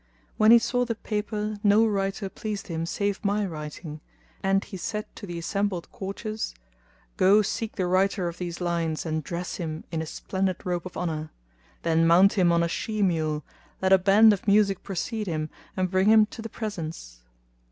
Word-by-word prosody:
When 215 0 +5
he 235 - +10
saw 245 +2 +1
the 235 -2 -2
paper 210 0 -3
no 210 +1 +5
writing 195 -1 -1
pleased 210 -3 -5
him 165 0 -2
save 200 +4 -2
my 205 0 +1
writing; 155 -2 -7 0.4
and 195 0 +2
he - - -9
said 210 +4 -3
to 205 - -9
the 175 -1 -5
assembled 195 +1 -2
courtiers, 215 - -5 0.6
"Go 205 +3 +5
seek 225 +2 -3
the 190 -4 0
writer 185 +1 +1
of 170 0 -6
these 175 -2 -4
lines 170 -3 -1
and 155 -1 -2
dress 175 +4 -4
him 160 -3 -4
in 160 -1 -1
a 160 - -5
splendid 190 +2 -2
robe 180 -1 -2
of 185 - -10
honour; 155 -3 -3 0.5
then 165 0 +3
mount 185 +4 +6
him 180 -5 +3
on 170 0 +3
a - - +1
she 215 +4 -2
mule,[FN#236] 155 -4 0 0.4
let 190 0 +5
a 190 - +7
band 205 +3 +6
of 200 - -5
music 200 -2 +3
precede 210 +3 -3
him 155 -2 -2 0.3
and 185 -1 0
bring 190 +1 +2
him 220 -1 +7
to 225 - -10
the 225 - -6
presence." 165 - -6
190 Hz, 185 wpm, -26 LUFS, 170-210 Hz, 0.6 s, he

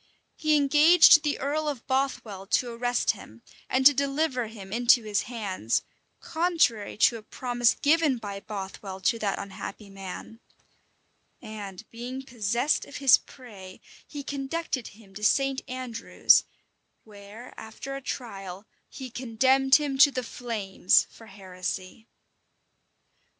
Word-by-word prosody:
He 310 -1 +2
engaged 305 +3 +7
the 295 -1 -1
earl 300 +3 -2
of 270 -5 -6
Bothwell 255 -8 -2
to 240 +3 0
arrest 245 +1 0
him, 115 - -14 0.3
and 260 +1 +1
to 290 - +9
deliver 275 -2 -1
him 200 -3 -10
into 240 0 +4
his 210 -1 0
hands, 195 - -2 0.4
contrary 325 - 0
to 230 +2 +4
a - - -11
promise 240 +1 0
given 300 -3 +2
by 200 -3 -6
Bothwell 195 -1 -7
to 230 +5 +1
that 200 -3 -1
unhappy 200 +1 -8
man; 195 +3 -9 1.0
and 200 -4 -9
being 250 +3 -7
possessed 235 +3 0
of 280 - -13
his 275 -3 +5
prey, 200 -8 -13 0.3
he 290 -2 -7
conducted 275 -2 -4
him 200 -4 -18
to 210 +2 -9
St. 270 +4 +2
Andrews, 250 -3 +2 0.6
where, 210 +3 -13
after 245 +5 -8
a 275 - -6
trial, 195 -7 -7 0.2
he 260 -2 -9
condemned 265 +3 +3
him 280 -3 0
to 285 - +8
the 255 -2 -4
flames 215 -7 +1
for 225 - -15
heresy. 190 +2 -7
240 Hz, 130 wpm, -26 LUFS, 205-275 Hz, 1.0 s, to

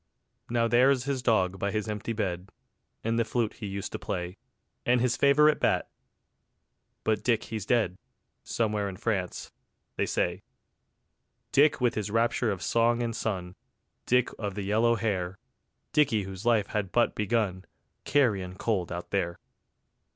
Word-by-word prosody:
Now 115 -1 +2
there's 125 +2 +4
his 135 -1 -2
dog 95 -6 +2
by 100 - 0
his 105 +1 -2
empty 105 +1 -3
bed, 95 -4 -3 0.5
And 115 +1 0
the - - +4
flute 115 0 -1
he 105 - -4
used 100 0 -4
to - - -5
play, 90 -2 -4 0.5
And 125 0 +3
his 125 0 +2
favourite 150 +2 +5
bat... - - +1 1.1
but 110 -2 +1
Dick 115 -1 +2
he's 110 -3 -5
dead, 110 -7 +1 0.4
Somewhere 105 -3 -1
in 95 - -8
France, 95 -5 -2 0.5
they - - +1
say: 90 +2 -1 1.1
Dick 145 +2 +4
with 125 -2 +2
his 105 -1 -3
rapture 115 +2 +1
of 100 -4 -3
song 120 +1 +2
and 115 -1 -2
sun, 95 -5 -3 0.5
Dick 125 0 +3
of 100 -3 -3
the 105 - -3
yellow 110 +4 +3
hair, 95 -4 -2 0.6
Dicky 130 -9 +3
whose 95 +3 -6
life 110 -4 +3
had 105 -3 -2
but 120 - +3
begun, 105 -4 0 0.4
Carrion 100 -10 +1
cold 95 -4 -1
out 90 0 -6
there. 85 -4 -1
110 Hz, 150 wpm, -28 LUFS, 95-120 Hz, 1.1 s, favourite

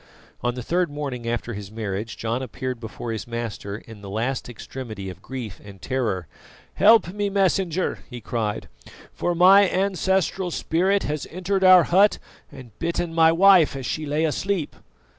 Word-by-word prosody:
On 120 0 -1
the 125 - -5
third 175 +4 0
morning 135 -5 -5
after 120 -1 -3
his 100 -1 -7
marriage 110 0 -5
John 115 +3 -2
appeared 130 -1 -5
before 115 +1 -6
his 110 0 -5
master 115 -4 -5
in 110 -2 -13
the 100 - -9
last 120 +6 -2
extremity 110 -5 -7
of - - -14
grief 125 -7 -7
and 100 -2 -12
terror. 105 -4 -2 0.5
"Help 220 -5 +5
me, 205 0 -1
Messenger!" 190 -3 0
he 125 -2 -7
cried, 110 -3 -3 0.5
"for 175 - -1
my 190 +3 +7
ancestral 190 -1 0
spirit 185 +4 +1
has 150 0 -3
entered 190 +2 -2
our 185 -2 +8
hut 195 +6 +4 0.3
and 130 -5 -12
bitten 170 0 -2
my 165 0 +5
wife 180 -3 +5
as 135 -2 -5
she 155 +3 -3
lay 150 +3 +1
asleep." 175 +1 -2
140 Hz, 160 wpm, -23 LUFS, 115-180 Hz, 0.5 s, our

